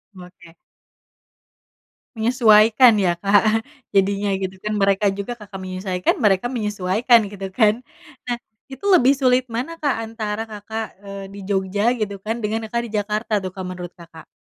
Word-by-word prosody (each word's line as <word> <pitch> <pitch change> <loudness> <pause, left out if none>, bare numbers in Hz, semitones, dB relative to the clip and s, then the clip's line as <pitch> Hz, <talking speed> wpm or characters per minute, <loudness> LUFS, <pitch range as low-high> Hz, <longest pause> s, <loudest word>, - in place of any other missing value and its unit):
Oke. 180 -2 -14 1.6
Menyesuaikan, 225 0 +5
ya, 180 -2 +2
Kak, 215 +3 +3 0.3
jadinya, 200 +1 +1
gitu, 190 0 -3
kan, 210 0 -2
mereka 195 0 +2
juga, 200 +5 -5
Kakak 205 -4 -10
menyesuaikan, 185 0 -1
mereka 200 +2 +3
menyesuaikan, 215 0 +2
gitu, 195 -1 -7
kan. 215 +2 +2 0.4
Nah, 245 -1 -2 0.3
itu 265 +7 -9
lebih 270 -6 +6
sulit 255 -2 +3
mana, 250 +9 -3
Kak, 285 -3 +1
antara 220 -1 -4
Kakak, 220 +1 -5 0.2
eee, 200 0 -7
di 200 - -9
Jogja, 200 +3 +1
gitu, 205 -2 -2
kan, 225 +2 -3
dengan 220 0 -2
Kakak 235 +2 -1
di - - -13
Jakarta, 210 +2 -3
tuh, 185 - -4
Kak, 185 0 -7
menurut 180 -1 -7
Kakak? 165 -2 -14
210 Hz, 150 wpm, -21 LUFS, 195-225 Hz, 1.6 s, lebih